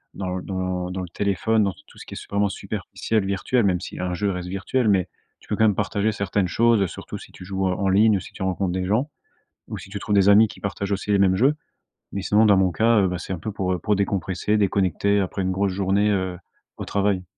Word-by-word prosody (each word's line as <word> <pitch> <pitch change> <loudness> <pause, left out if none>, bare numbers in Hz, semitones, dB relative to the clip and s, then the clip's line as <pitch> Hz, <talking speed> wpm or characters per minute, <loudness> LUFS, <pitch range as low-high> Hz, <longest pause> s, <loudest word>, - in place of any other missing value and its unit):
dans 95 -1 -3
l - - -10
dans 95 -1 -3
dans 95 +1 -4
le 90 - -6
téléphone, 105 +4 +1
dans 95 - -1
t - - -20
tout - - -18
ce - - -10
qui - - -8
est - - -9
vraiment 100 0 +2
superficiel, 110 +2 -3
virtuel, 100 +5 0
même 90 -3 +2
si 90 - -8
un 90 -1 -2
jeu 100 +2 0
reste 90 -1 -5
virtuel, 110 +5 -1
mais 95 -3 +2 0.3
tu - - -21
peux 105 - 0
quand 110 - +3
même 105 -3 +3
partager 105 +4 0
certaines 100 -2 -1
choses, 115 +2 +3
heu, 95 - +2
surtout - - -8
si - - -13
tu 90 - -12
joues 95 0 -1
en 90 - +1
en 100 -1 +1
ligne 105 +2 +4
ou - - -3
si - - -11
tu - - -11
rencontres 95 0 -1
des 95 0 -2
gens, 115 +10 0 0.6
ou - - -6
si - - -11
tu 100 0 -5
trouves 105 +1 -1
des 100 0 +5
amis 105 +2 +7
qui - - -12
partagent 100 0 -3
aussi 100 +1 -1
les 100 - +3
mêmes 95 -1 +4
jeux. 135 +8 +3 0.6
Mais, 100 - -3
sinon, 105 +3 +3
dans 100 -2 +6
mon 95 -2 +3
cas, 110 +3 +3
heu, 95 - +3
bah, 90 - -2
c'est 95 - -5
un 90 - -5
peu 110 +6 -4
pour, 95 -2 -1
heu, 90 - -2
pour 105 +4 +1
décompresser, 100 +1 0
déconnecter 100 0 +1
après 95 0 -2
une 95 0 0
grosse 95 +1 0
journée, 100 +2 +1
heu, 95 -3 -1 0.4
au - - -5
travail. 100 -2 0
100 Hz, 265 wpm, -23 LUFS, 95-105 Hz, 0.6 s, amis